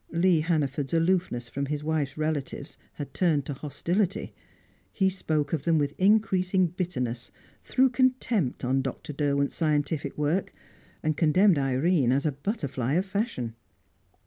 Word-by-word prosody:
Lee 170 0 +3
Hannaford's 150 -3 0
aloofness 165 -8 +1
from 140 +4 -3
his 150 +1 -3
wife's 150 -3 -1
relatives 155 -2 -3 0.2
had 145 - -7
turned 155 -7 +1
to 145 - -4
hostility; 170 +8 -2 0.6
he 190 -2 +2
spoke 155 -5 -1
of 155 - 0
them 165 +1 +2
with 145 -1 0
increasing 190 -2 +3
bitterness, 130 -9 -3 0.3
threw 265 +1 +3
contempt 250 - +1
on 135 +2 +2
Dr. 135 +3 -5
Derwent's 140 -1 0
scientific 150 -2 0
work, 150 +6 0 0.5
and 155 -1 +1
condemned 175 +2 +4
Irene 135 +1 +2
as 140 +3 +1
a 155 - +2
butterfly 140 - -2
of 180 +4 +2
fashion. 195 - -2
155 Hz, 140 wpm, -27 LUFS, 140-185 Hz, 0.6 s, condemned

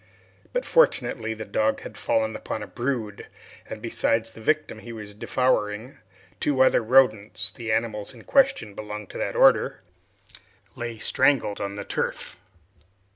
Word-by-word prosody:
But - - -1
fortunately 115 - +2
the 110 0 -6
dog 110 +2 0
had 105 - -9
fallen 110 +1 0
upon 110 - -5
a - - -8
brood, 120 -5 -3 0.4
and - - -7
besides 115 0 0
the 115 - -13
victim 155 -3 0
he 120 - -9
was 105 -2 -8
devouring, 110 +1 -1 0.4
two 135 -3 +3
other 130 - +4
rodents 110 -4 +3
the 115 0 -5
animals 110 -2 -1
in - - -14
question 270 - +2
belonged 105 0 -7
to - - -7
that - - -2
order - - +4 0.9
lay 120 -1 -5
strangled 130 -2 +2
on 100 0 -3
the 100 - -5
turf. - - -3
110 Hz, 145 wpm, -25 LUFS, 105-130 Hz, 0.9 s, other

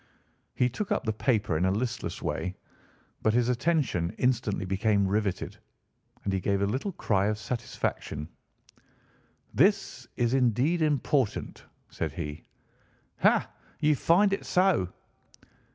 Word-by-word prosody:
He 125 - +3
took 185 - -4
up - - +1
the 110 - -1
paper 105 - +1
in 85 - 0
a - - +3
listless 120 +4 -3
way, 90 +1 -2 0.7
but 110 0 +2
his 120 0 +3
attention 125 - +1
instantly 120 -6 0
became 100 +1 +2
riveted, 100 -1 -1 0.7
and 100 - -1
he 95 - +1
gave 100 +2 0
a - - +4
little 130 - -2
cry 100 -9 +1
of 105 0 0
satisfaction. 110 - -3 1.3
"This 195 - +2
is 120 0 +1
indeed 135 +6 +2
important," 145 -5 0 0.3
said - - -3
he. 75 +1 -5 0.8
"Ha! - - +4 0.3
you 150 -1 +3
find 195 +8 +4
it 195 - -2
so?" 180 - +2
120 Hz, 130 wpm, -28 LUFS, 100-140 Hz, 1.3 s, a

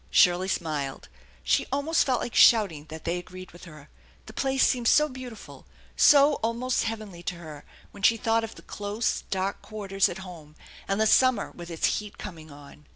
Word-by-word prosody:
Shirley 180 +1 +4
smiled. 150 -7 -3 0.3
She - - +1
almost 285 +4 +1
felt 255 -3 +1
like 240 - -5
shouting 195 -10 +4
that 160 0 -9
they 175 +1 -2
agreed 185 +1 -11
with 175 - -14
her. 150 -3 -13 0.4
The - - -12
place 270 0 +1
seemed 245 -3 0
so 300 +5 +5
beautiful, 255 -5 -11 0.3
so 290 0 +5
almost 235 +3 -1
heavenly 215 -6 -6
to 175 +1 -4
her 155 -4 -11 0.3
when 200 - -13
she 230 +4 +4
thought 225 +1 +1
of 225 - -7
the - - -14
close, 210 +3 -3
dark 195 +1 -2
quarters 195 -3 -1
at 175 - -6
home 155 -4 -12 0.3
and 195 +1 -1
the 220 - +3
summer 255 -1 +3
with 175 0 -10
its 165 -2 0
heat 210 -1 -10
coming 160 -6 -9
on. 145 0 -15
195 Hz, 185 wpm, -26 LUFS, 170-230 Hz, 0.4 s, so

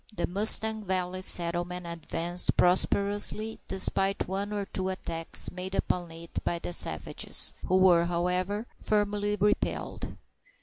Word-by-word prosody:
The 210 - -2
Mustang 220 +3 +5
Valley 185 -1 -3
settlement 175 0 +1
advanced 170 +1 0
prosperously, 205 +4 +1
despite 195 +1 +1
one 195 +2 -3
or 205 -1 -3
two 190 -1 -4
attacks 165 -3 -2
made 185 +1 -6
upon 175 -3 -1
it 165 +1 -8
by 170 - -1
the 175 - -6
savages, - - -1
who 185 - +3
were, 180 -3 +5
however, 180 +5 -2
firmly 205 0 -1
repelled. 210 +1 -2
185 Hz, 125 wpm, -28 LUFS, 175-205 Hz, -, Mustang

